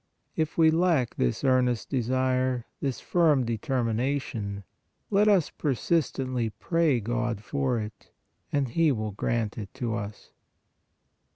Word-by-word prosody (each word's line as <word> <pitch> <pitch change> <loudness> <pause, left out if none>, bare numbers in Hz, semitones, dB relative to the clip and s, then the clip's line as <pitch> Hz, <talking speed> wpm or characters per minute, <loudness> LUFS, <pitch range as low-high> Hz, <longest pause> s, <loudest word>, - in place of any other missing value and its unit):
If 155 -1 -1
we 160 -1 +6
lack 160 -7 +2
this 60 - -1
earnest 125 -3 +2
desire, 130 -1 +1
this 135 -3 -2
firm 155 -7 +3
determination, 115 -3 -2 0.5
let 205 +1 +4
us 195 -7 +4
persistently 130 -4 0
pray 145 - +1
God 115 -1 -2
for 130 -1 0
it, 105 0 -8 0.4
and 140 -3 +1
He 160 +5 +3
will 110 -4 -2
grant 110 +1 -2
it 100 -3 -7
to 120 -4 -2
us. 105 -2 -6
125 Hz, 120 wpm, -27 LUFS, 115-145 Hz, 0.5 s, we